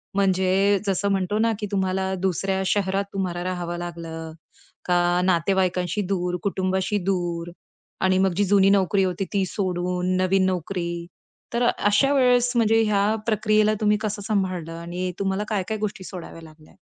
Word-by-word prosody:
म्हणजे 195 +1 +2
जसं 195 +1 +1
म्हणतो 195 +2 0
ना, 230 +1 +3
की 210 - -3
तुम्हाला 190 -1 0
दुसऱ्या 190 +1 0
शहरात 195 0 0
तुम्हाला 180 -3 -2
राहावं 175 -1 -3
लागलं 165 -2 -6 0.5
का 175 0 +2
नातेवाईकांशी 185 +1 +1
दूर, 180 -2 -1
कुटुंबाशी 190 +1 0
दूर 175 -2 -2 0.6
आणि 185 0 +3
मग 190 -2 +2
जी 205 - +3
जुनी 195 0 +4
नोकरी 195 0 +3
होती 185 +1 -1
ती 195 -2 +2
सोडून 180 -1 -1
नवीन 190 +1 +3
नोकरी. 175 -1 -2 0.5
तर 235 +1 +1
अशा 210 +7 +3
वेळेस 250 -2 +3
म्हणजे 225 -1 +4
ह्या 205 -2 +2 0.2
प्रक्रियेला 215 -1 +3
तुम्ही 210 0 +3
कसं 210 -1 -3
सांभाळलं? 185 -6 -1
आणि 180 +2 -4
तुम्हाला 195 +1 -1
काय 205 -3 0
काय 220 - -2
गोष्टी 210 -2 -4
सोडाव्या 175 -3 -9
लागल्या? 155 -1 -16
190 Hz, 150 wpm, -24 LUFS, 180-200 Hz, 0.6 s, जुनी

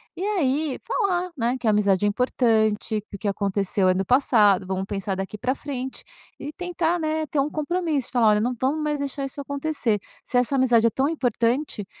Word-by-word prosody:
E 360 - -5
aí 310 -8 0
falar, 365 -6 0
né, 245 -1 0
"Que 255 - -9
a - - +5
amizade 205 -2 +2
é - - +4
importante, 220 -2 +1
que - - -8
o - - -9
que 210 - -3
aconteceu 195 -1 0
é - - +4
no 190 +1 -1
passado, 210 -6 +4
vamos 190 0 -2
pensar 195 -1 -3
daqui 195 +2 -5
para 255 +4 0
frente". 265 -2 -6 0.4
E 290 +2 -6
tentar, 350 -1 -1
né, 315 0 -1
ter 300 -1 -2
um 275 +2 +1
compromisso, 310 -3 -1
e - - -18
falar: 240 -3 +3
"Olha, 210 0 +3
não 245 +3 0
vamos 280 +4 0
mais 300 -1 -1
deixar 275 0 -3
isso 275 +2 -6
acontecer. 280 -6 -1 0.2
Se 250 - -1
essa 250 +3 +2
amizade 245 -4 +4
é - - +6
tão 265 +6 0
importante, 245 -4 -1
255 Hz, 210 wpm, -24 LUFS, 210-300 Hz, 0.4 s, é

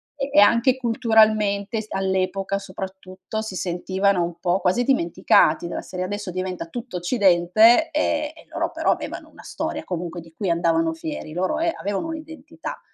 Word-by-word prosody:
E 275 0 -3
e - - +6
anche 235 +5 +5
culturalmente 220 -3 +2
s 215 - -13
all'epoca 190 +1 -1
soprattutto 190 +2 -7
si 220 -4 -6
sentivano 185 +2 0
un 170 0 -5
po' 180 +1 +1
quasi 190 +7 +2
dimenticati, 170 - +3
della - - -4
serie 185 0 -5
"adesso 205 -1 -4
diventa 185 -1 -4
tutto 240 +2 -7
occidente" 195 +3 +4
ehm, 85 -1 +1
e - - -17
loro - - -1
però - - +1
avevano - - -4
una - - -16
storia 80 - -4
comunque 175 -1 -5
di 165 0 -16
cui 190 +2 -3
andavano 325 - +1
fieri, 315 - -6
loro 185 - -1
è 335 +1 +1
avevano 200 +10 -3
un'identità. 320 0 -8
195 Hz, 160 wpm, -23 LUFS, 180-235 Hz, -, e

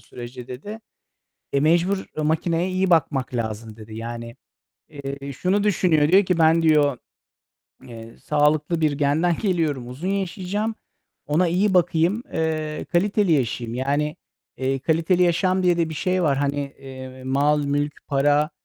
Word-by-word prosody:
sürece" 120 +2 -10
dedi. 205 - -8 0.7
"E, 140 - +3
mecbur 175 +6 +2 0.2
makineye 165 +3 0
iyi 185 0 0
bakmak 135 -6 +1
lazım." 110 -1 -4
dedi. 110 0 -11
Yani, 115 +1 -6 0.5
eee, 140 -1 -7
şunu 190 +9 0
düşünüyor, 170 -7 +3
diyor 195 +4 +5
ki 180 -1 0
"Ben" 165 0 +4
diyor, 150 -5 +3 0.8
eee, 115 -1 -11
"Sağlıklı 150 +2 +1
bir 155 -2 +2
genden 150 +4 +1
geliyorum, 160 - 0
uzun 140 +9 -5
yaşayacağım. 200 +3 -2 0.5
Ona 165 +5 +2
iyi 190 +4 +1
bakayım, 175 +5 +2
eee, 155 -1 -2
kaliteli 195 0 +2
yaşayayım." 120 -4 -1
Yani, 145 +4 -1 0.4
eee, 135 +1 -1
kaliteli 165 +5 +1
yaşam 185 +2 +2
diye 180 -1 +3
de 165 -1 +1
bir 160 - -6
şey 185 +3 0
var. 140 -4 +2
Hani, 145 0 0 0.2
eee, 130 -1 -10
mal, 145 +3 +2
mülk, 145 +1 -2
para, 145 +2 +2
150 Hz, 140 wpm, -23 LUFS, 135-175 Hz, 0.8 s, diyor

